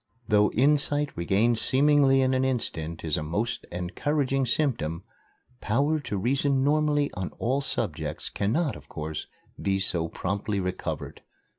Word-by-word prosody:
Though 105 -2 +4
insight 145 +2 +2
regained 105 +7 +2
seemingly 140 -1 +4
in 130 0 +2
an 130 0 +2
instant 85 -11 -3
is 80 - +1
a - - -2
most 95 +10 -2
encouraging 135 - -1
symptom, 100 - 0 0.6
power 145 +8 +1
to 105 -8 -4
reason 135 +5 +1
normally 145 0 +2
on 95 -2 -4
all 130 +4 0
subjects 140 - -3
cannot, 135 +9 0
of - - -13
course, 75 -1 -5 0.3
be 95 -1 +1
so 85 -3 +2
promptly 100 +4 -2
recovered. 90 -1 -4
120 Hz, 135 wpm, -27 LUFS, 95-140 Hz, 0.6 s, Though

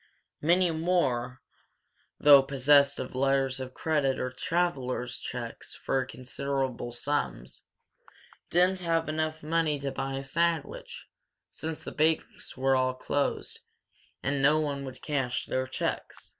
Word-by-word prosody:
Many 175 +3 +3
more, 160 -7 0 0.8
though 145 -2 +9
possessed 140 +1 +4
of 130 - -5
letters 135 0 +1
of 130 0 -7
credit 145 -4 +1
or 125 - -2
travellers' 130 -5 -1
checks 120 -2 -6
for 135 -1 0
considerable 130 -1 -3
sums, 120 - -3 0.8
didn't 180 +2 +3
have 165 -2 0
enough 155 0 -2
money 160 -1 +1
to 140 0 -3
buy 135 0 -3
a 135 - -4
sandwich; 165 +2 -1 0.5
since 160 -1 -5
the - - -6
banks 155 -2 -1
were 135 +1 +3
all 130 0 +1
closed 140 +2 -1 0.6
and 140 0 0
no 150 +3 +5
one 140 -2 -2
would 130 -1 -9
cash 135 -5 -1
their 130 0 -1
checks. 130 - -4
140 Hz, 130 wpm, -29 LUFS, 130-155 Hz, 0.8 s, though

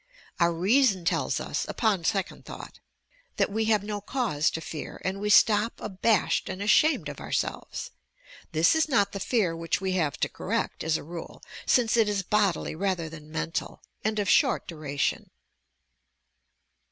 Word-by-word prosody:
Our 170 -1 +4
reason 195 +2 +2
tells - - 0
us. - - -2
upon 205 -7 0
second 195 -1 -1
thought, - - -10 0.6
that - - +1
we 220 +2 0
have 215 -2 +2
no 205 0 -4
cause 205 - 0
to - - -4
fear, 160 -1 -7
and 190 +1 -1
we 210 - -1
stop 210 +1 +5
abashed 205 +2 +1
and 185 0 -5
ashamed 215 - +3
of 145 -1 -7
ourselves. - - -3 0.6
This 160 +2 +4
is 320 -1 +2
not 205 -7 +3
the 195 - -5
fear 195 -5 +1
which 165 0 -1
we 190 0 -2
have 165 -6 0
to - - +3
corrhat, - - -3
as 160 -1 +1
a - - -8
rule, 165 +2 -9 0.2
since 240 -2 +3
it 220 -2 +4
is 200 -2 -1
bodily 200 -3 +1
rather 175 -1 -1
than 155 -1 -11
mental, 165 +1 -4 0.2
and 215 0 0
of 205 -2 0
short 265 +3 +3
duration. 145 -4 -2
195 Hz, 165 wpm, -27 LUFS, 165-215 Hz, 0.6 s, stop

